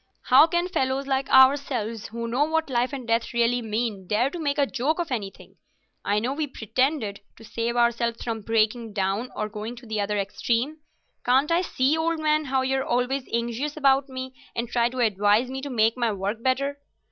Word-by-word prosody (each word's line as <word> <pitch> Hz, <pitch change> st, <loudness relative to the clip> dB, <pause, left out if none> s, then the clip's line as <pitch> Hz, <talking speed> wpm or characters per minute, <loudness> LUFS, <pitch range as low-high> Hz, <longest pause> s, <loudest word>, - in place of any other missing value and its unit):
"How 275 Hz, +5 st, +7 dB
can 345 Hz, +2 st, 0 dB
fellows 270 Hz, -6 st, -1 dB
like 270 Hz, 0 st, -1 dB
ourselves, 260 Hz, -5 st, +3 dB
who 235 Hz, +1 st, -5 dB
know 245 Hz, +5 st, +1 dB
what 320 Hz, -2 st, -1 dB
life 245 Hz, +2 st, +1 dB
and 265 Hz, -4 st, -6 dB
death 230 Hz, +1 st, 0 dB
really 235 Hz, +1 st, +2 dB
mean, 215 Hz, -3 st, -3 dB
dare 235 Hz, +7 st, +1 dB
to 350 Hz, -, -6 dB
make 290 Hz, -2 st, -1 dB
a 285 Hz, -, +3 dB
joke 270 Hz, +4 st, -1 dB
of 345 Hz, -5 st, -3 dB
anything? 205 Hz, -6 st, -6 dB, 0.5 s
I 205 Hz, +1 st, +1 dB
know 240 Hz, +5 st, 0 dB
we 300 Hz, +1 st, -2 dB
pretend 260 Hz, +4 st, 0 dB
it, 200 Hz, -1 st, -5 dB, 0.2 s
to 225 Hz, -, -15 dB
save 230 Hz, +1 st, -2 dB
ourselves 235 Hz, -1 st, +1 dB
from 225 Hz, -2 st, -3 dB
breaking 225 Hz, +1 st, 0 dB
down 200 Hz, +4 st, -1 dB
or 215 Hz, -, -2 dB
going 215 Hz, +2 st, -6 dB
to 240 Hz, +1 st, -13 dB
the 215 Hz, -2 st, -2 dB
other 205 Hz, +1 st, -1 dB
extreme. 235 Hz, +8 st, -1 dB, 0.5 s
Can't 265 Hz, +5 st, +3 dB
I 340 Hz, +1 st, +3 dB
see, 280 Hz, -4 st, +1 dB
old 325 Hz, 0 st, 0 dB
man, 305 Hz, 0 st, +1 dB
how 265 Hz, -1 st, 0 dB
you're 265 Hz, 0 st, 0 dB
always 250 Hz, +2 st, -1 dB
anxious 235 Hz, +6 st, -2 dB
about 275 Hz, -1 st, +3 dB
me, 260 Hz, 0 st, -6 dB, 0.2 s
and 235 Hz, +1 st, -2 dB
try 235 Hz, 0 st, +1 dB
to 255 Hz, 0 st, -3 dB
advise 210 Hz, +3 st, +2 dB
me 265 Hz, 0 st, -4 dB
to 285 Hz, -, -5 dB
make 225 Hz, -3 st, +2 dB
my 235 Hz, -3 st, 0 dB
work 200 Hz, +3 st, -3 dB
better? 275 Hz, +3 st, 0 dB
245 Hz, 205 wpm, -25 LUFS, 225-275 Hz, 0.5 s, How